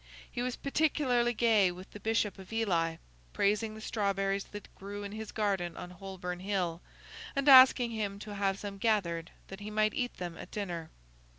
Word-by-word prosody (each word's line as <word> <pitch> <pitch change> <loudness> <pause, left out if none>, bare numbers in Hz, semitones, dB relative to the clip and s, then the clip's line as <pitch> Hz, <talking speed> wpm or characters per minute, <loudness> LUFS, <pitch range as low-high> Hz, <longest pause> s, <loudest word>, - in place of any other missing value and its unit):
He 240 - -3
was 250 0 -1
particularly 275 -5 +1
gay 215 -5 +4
with 180 +2 -11
the 205 - -9
Bishop 215 -1 0
of 190 +1 -11
Ely: 175 -8 +1 0.4
praising 215 +2 +1
the 220 - -9
strawberries 195 -2 0
that 205 -1 -10
grew 205 +1 -7
in 200 - -6
his 220 0 -6
garden 195 -5 -1
on 180 - -7
Holborn 180 -1 -6
Hill, 180 -3 -1 0.5
and 275 +1 0
asking 255 -3 +8
him 205 -3 -3
to 210 0 -8
have 195 -1 0
some 200 -1 -7
gathered 175 -7 0 0.2
that 195 - -8
he 205 +1 -6
might 215 0 +2
eat 245 -1 -2
them 175 -2 -6
at - - -8
dinner. 175 -6 -4
205 Hz, 180 wpm, -31 LUFS, 190-220 Hz, 0.5 s, asking